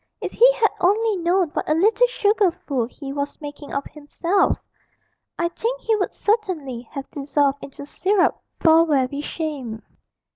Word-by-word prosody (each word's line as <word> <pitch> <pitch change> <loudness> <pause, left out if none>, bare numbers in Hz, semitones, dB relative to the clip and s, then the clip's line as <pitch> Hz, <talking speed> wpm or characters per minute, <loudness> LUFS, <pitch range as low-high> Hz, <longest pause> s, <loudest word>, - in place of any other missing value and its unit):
If - - -4
he - - +6
had 445 -3 +2
only 420 +4 +2
known 350 0 +1
what - - -4
a 305 - +3
little 440 +8 +4
sugar 415 -4 +2
fool 270 -7 -3
he 275 +2 -8
was 285 0 -4
making 290 -1 -9
of 280 - -2
himself, 335 +6 0 0.8
I 340 - +1
think 470 +8 -3
he 445 - +1
would 395 -3 -1
certainly 320 - -2
have 275 -2 -5
dissolved 285 0 0
into 280 +1 -9
syrup 375 +5 +1 0.2
for 325 0 +5
very 280 -1 +1
shame. 280 -9 -5
320 Hz, 155 wpm, -22 LUFS, 280-405 Hz, 0.8 s, he